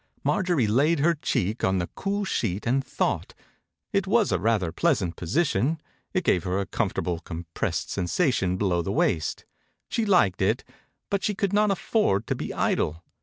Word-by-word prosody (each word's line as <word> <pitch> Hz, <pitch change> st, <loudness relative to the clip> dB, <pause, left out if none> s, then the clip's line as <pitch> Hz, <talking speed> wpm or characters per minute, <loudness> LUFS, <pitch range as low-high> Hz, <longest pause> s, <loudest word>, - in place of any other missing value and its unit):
Marjorie 175 Hz, -, +2 dB
laid 140 Hz, +10 st, +3 dB
her 165 Hz, +4 st, +3 dB
cheek 110 Hz, -, -1 dB
on 95 Hz, 0 st, +2 dB
the 85 Hz, -, 0 dB
cool 200 Hz, +1 st, -2 dB
sheet 105 Hz, -, -1 dB
and 130 Hz, +3 st, +2 dB
thought. -, -, -2 dB, 0.6 s
It 195 Hz, -1 st, +1 dB
was 215 Hz, 0 st, +3 dB
a -, -, +2 dB
rather 100 Hz, -4 st, +1 dB
pleasant 95 Hz, -, +1 dB
position. 140 Hz, -, 0 dB, 0.3 s
It 185 Hz, -1 st, 0 dB
gave 90 Hz, -, +2 dB
hera 95 Hz, +2 st, -1 dB
comfortablecompressed 85 Hz, -2 st, -2 dB
sen 95 Hz, -, -2 dB
sation 95 Hz, -, +1 dB
below 95 Hz, -3 st, +1 dB
the 95 Hz, -, -3 dB
waist. 80 Hz, -6 st, 0 dB, 0.4 s
She 230 Hz, -, 0 dB
liked 175 Hz, -, +3 dB
it -, -, +1 dB, 0.5 s
but 200 Hz, -1 st, 0 dB
she 210 Hz, -, 0 dB
could 200 Hz, 0 st, -1 dB
not 210 Hz, +1 st, +4 dB
afford 195 Hz, -, +1 dB
to -, -, 0 dB
be -, -, -4 dB
idle. 80 Hz, +3 st, 0 dB
115 Hz, 165 wpm, -26 LUFS, -, 0.6 s, not